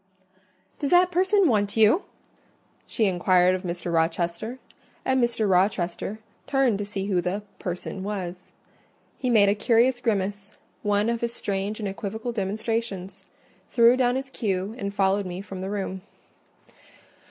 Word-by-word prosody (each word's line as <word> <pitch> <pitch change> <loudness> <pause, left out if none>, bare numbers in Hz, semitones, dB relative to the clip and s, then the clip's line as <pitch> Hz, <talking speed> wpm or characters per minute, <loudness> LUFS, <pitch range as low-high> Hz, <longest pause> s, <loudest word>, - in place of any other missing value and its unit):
"Does 285 - -1
that 360 +1 +5
person 375 +2 +3
want 205 -4 +1
you?" 225 - +5 0.8
she 225 - +1
inquired 180 -1 +3
of 185 - -2
Mr. 175 -1 -4
Rochester; 170 +7 -1 0.5
and 260 -1 +2
Mr. 230 -3 +1
Rochester 185 +1 +1 0.3
turned 270 -7 +2
to 205 - -2
see 200 -1 -4
who 190 -3 +1
the 190 +4 -2 0.2
"person" 180 +1 -5
was. 185 -3 -5 0.7
He 255 - -1
made 215 -4 +5
a 200 - +4
curious 235 +4 +3
grimace—one 205 -1 -2
of 235 0 -1
his 235 0 -2
strange 200 +2 -3
and 210 - -2
equivocal 220 +4 -4
demonstrations—threw 220 +2 -1
down 250 -1 +2
his 265 0 -4
cue 195 -3 -2
and 200 -1 -3
followed 195 0 +1
me 180 0 -5
from 195 -1 -7
the 190 - -4
room. 190 -2 -3
205 Hz, 140 wpm, -25 LUFS, 190-235 Hz, 0.8 s, that